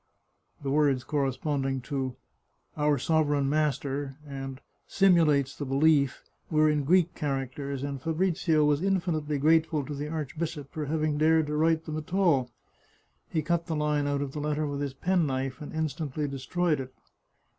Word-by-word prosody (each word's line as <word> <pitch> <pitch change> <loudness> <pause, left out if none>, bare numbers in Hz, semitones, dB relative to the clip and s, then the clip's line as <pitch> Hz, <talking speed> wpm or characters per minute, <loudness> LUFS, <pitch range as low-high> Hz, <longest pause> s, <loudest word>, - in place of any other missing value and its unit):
(The 135 - -1
words 140 -3 +2
correspond 140 0 -1
ing 135 -1 -1
to 130 -1 -3 0.6
our 150 -1 +2
sovereign 145 0 +1
master 140 -2 -1
and 135 -2 -6 0.3
simtdates 155 -8 +3
the - - -5
belief 140 0 +2 0.3
were 155 -1 +4
in 150 -2 +1
Greek 175 +2 +3
characters, 140 -1 -3
and 140 -2 -4
Fabrizio 165 -1 +1
was 150 0 +2
infinitely 170 -6 0
grateful 160 0 +2
to 150 - -5
the 145 +1 -4
archbishop 155 -1 -4
for 155 -1 -3
having 155 -1 0
dared 160 0 +4
to 150 0 -3
write 160 +1 +2
them 155 -1 -4
at 155 +4 -5
all. 155 -10 +3 0.8
He 160 -2 -1
cut 170 0 0
the 160 - -1
line 150 -1 0
out 145 0 0
of 140 - -5
the 150 - -5
letter 150 +1 -1
with 145 -1 -3
his 140 -2 -3
penknife, 135 -7 0
and 150 - -7
instantly 155 -1 -2
destroyed 150 +4 -1
it.) 130 -1 -7
150 Hz, 160 wpm, -28 LUFS, 140-160 Hz, 0.8 s, were